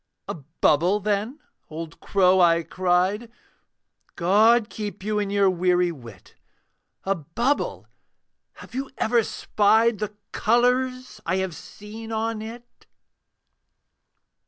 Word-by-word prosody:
'A - - -3 0.3
bubble, 175 +7 +3
then, 210 +7 -2 0.3
old 160 +1 -8
crow,' 190 -1 +3
I 170 -1 +4
cried, 185 +6 0 0.8
'God 210 +6 +4
keep 205 -3 -6
you 210 0 -1
in 205 -1 -2
your 200 -1 +3
weary 180 -1 +2
wit! 120 - -13 0.7
'A 195 - +1
bubble 215 - -2 0.7
have - - -14
you 270 +2 -4
ever 235 +1 +2
spied 220 +1 +2
'The 210 -1 -3 0.2
colours 250 +2 +1
I 175 - -1
have 190 -3 -2
seen 220 +7 -10
on 225 0 -2
it?' 235 +2 -11
205 Hz, 110 wpm, -24 LUFS, 180-225 Hz, 0.8 s, I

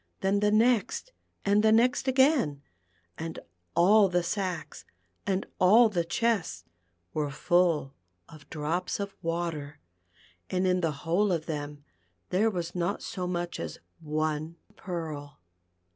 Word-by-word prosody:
Then 195 +1 +2
the 210 0 +3
next 230 - +2 0.3
and 205 +1 +4
the 220 0 +4
next 245 +4 +3
again, 260 - +3 0.6
and 165 0 -5 0.4
all 200 +3 +6
the 175 -1 +1
sacks, 180 -3 -3 0.4
and 195 0 0
all 220 +5 +6
the 175 -5 0
chests 175 - -1 0.5
were 150 -2 -1
full 165 -1 +1 0.3
of 150 -2 -15
drops 160 +6 -2
of 200 0 -4
water, 165 -4 -3 0.7
and 185 0 0
in 180 0 +2
the 165 -2 +1
whole 190 +5 +2
of 165 -3 -1
them 145 -2 -5 0.5
there 210 +5 +3
was 175 -4 -4
not 180 +3 -2
so 180 -2 -4
much 175 -1 -3
as 85 -2 -5 0.2
one 155 +1 -2 0.2
pearl. 155 - -6
175 Hz, 130 wpm, -28 LUFS, 155-205 Hz, 0.7 s, all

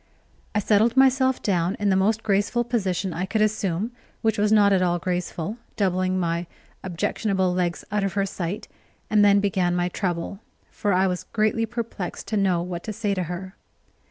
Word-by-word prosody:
I - - +3
settled 215 +4 +3
myself 265 0 +4
down 180 -2 +1
in 205 -1 +1
the - - +3
most 215 +4 +2
graceful 210 +3 +1
position 195 -6 -1
I 180 +3 -2
could 215 +3 +1
assume, 210 0 -1 0.3
which 220 -1 +1
was 210 0 +2
not 205 -2 +5
at 190 - +3
all 175 -1 +2
graceful, 180 +3 -3 0.2
doubling 185 -1 +1
my 170 0 -1 0.4
objectionable 190 +1 0
legs 175 -1 -1
out 210 -1 +1
of 195 -2 -1
her 195 +1 +1
sight; 190 +1 -4 0.4
and 210 -1 +5
then 200 0 +6
began 185 -3 +1
my 175 0 +1
trouble, 180 0 -3 0.3
for 205 - -1
I 185 +1 +3
was 180 -1 -2
greatly 225 +1 +1
perplexed 230 -5 -5
to 220 - -1
know 185 -4 +2
what 175 -1 -5
to 215 - -4
say 210 -1 -1
to 185 -2 -1
her. 185 +2 -6
195 Hz, 185 wpm, -24 LUFS, 180-215 Hz, 0.4 s, then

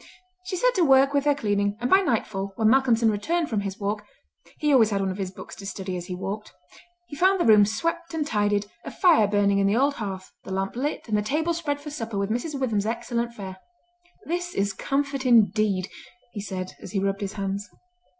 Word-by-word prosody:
She 365 - -3
set - - +2
to 375 - +1
work 270 -1 +5
with 285 0 +1
her 290 -1 +4
cleaning; 205 -5 0
and 245 - -1
by 380 - +6
nightfall, 210 - -1
when 220 0 +3
Malcolmson 235 -3 +4
returned 320 +10 -1
from 215 - +1
his 195 -1 -5
walk—he 210 +8 -4
always 230 -5 +6
had 200 -2 0
one 195 -1 0
of 185 - -7
his 190 -2 -2
books 185 - -10
to 195 - -9
study 190 -1 -4
as 175 0 -6
he 180 - -4
walked—he 215 - -9
found 380 +5 +3
the - - +2
room 210 -2 +7
swept 335 +9 -2
and 310 -2 -1
tidied, 205 -4 +1 0.2
a - - -6
fire 335 - +4
burning 200 -1 +2
in 195 - +3
the 205 +3 +2
old 280 +3 +3
hearth, 195 -7 -6
the - - -9
lamp 195 +2 -2
lit, 280 +3 -3
and 215 - 0
the 210 - +2
table 315 +9 0
spread 305 -4 -2
for 295 +1 -8
supper 225 -7 -4
with 200 +1 -1
Mrs. 275 +5 -2
Witham's 215 -6 0
excellent 235 0 -2
fare. 190 -3 -7 0.7
"This 350 +2 -3
is 200 0 0
comfort, 275 +4 -2
indeed," 215 -5 +3 0.4
he 205 - -6
said, 185 -2 -5
as - - -9
he 200 - +1
rubbed 195 +1 -1
his 200 0 -3
hands. 200 0 -4
220 Hz, 215 wpm, -25 LUFS, 200-285 Hz, 0.7 s, room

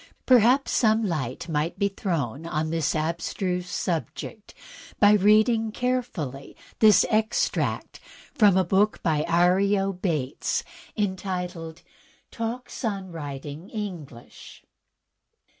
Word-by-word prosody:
Perhaps 255 +2 +4
some 220 -1 +3
light 150 - -3
may 155 0 0
be 200 - +2
thrown 165 - -3
on 155 -1 -2
this 165 -1 0
abstruse 175 +3 -2
subject 180 +6 -4 0.4
by 205 0 +7
reading 215 +2 +4
carefully 215 - -3 0.2
this 210 -4 +6
extract 220 0 0 0.3
from 205 -4 +5
a 190 - +4
book 195 +4 +1
by 155 -3 +1
Arlo 195 +3 +2
Bates, 160 -8 -2 0.3
entitled 180 -5 -3 0.5
"Talks 235 +4 -5
on 195 -5 -3
Writing 145 +2 -7
EngUsh.'' 175 - -8
185 Hz, 100 wpm, -25 LUFS, 160-210 Hz, 0.5 s, by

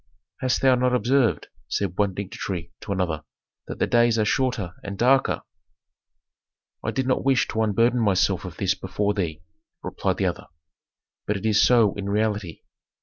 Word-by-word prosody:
"Hast 130 0 0
thou 130 -1 +6
not 125 0 +2
observed," 125 -1 +1 0.2
said 95 -3 -2
one 100 -2 0
dignitary 90 -3 -5
to - - -6
another, 85 -5 -1 0.4
"that - - -6
the - - +1
days 120 -1 +3
are 110 - +2
shorter 115 -7 0
and 100 0 -6
darker?" 130 +4 +2 1.4
"I - - -1
did 130 - -1
not 130 - 0
wish 135 -2 +2
to 110 - -1
unburden 115 +3 +2
myself 95 -4 +2
of 90 -3 -8
this 95 -1 +1
before 100 +2 -2
thee," 80 -6 -3 0.4
replied - - -2
the - - 0
other, - - -3 0.8
"but 105 - 0
it 100 - -7
is 105 -2 +4
so 115 -5 +4
in 100 0 -5
reality. 105 -4 -1
105 Hz, 165 wpm, -24 LUFS, 95-120 Hz, 1.4 s, thou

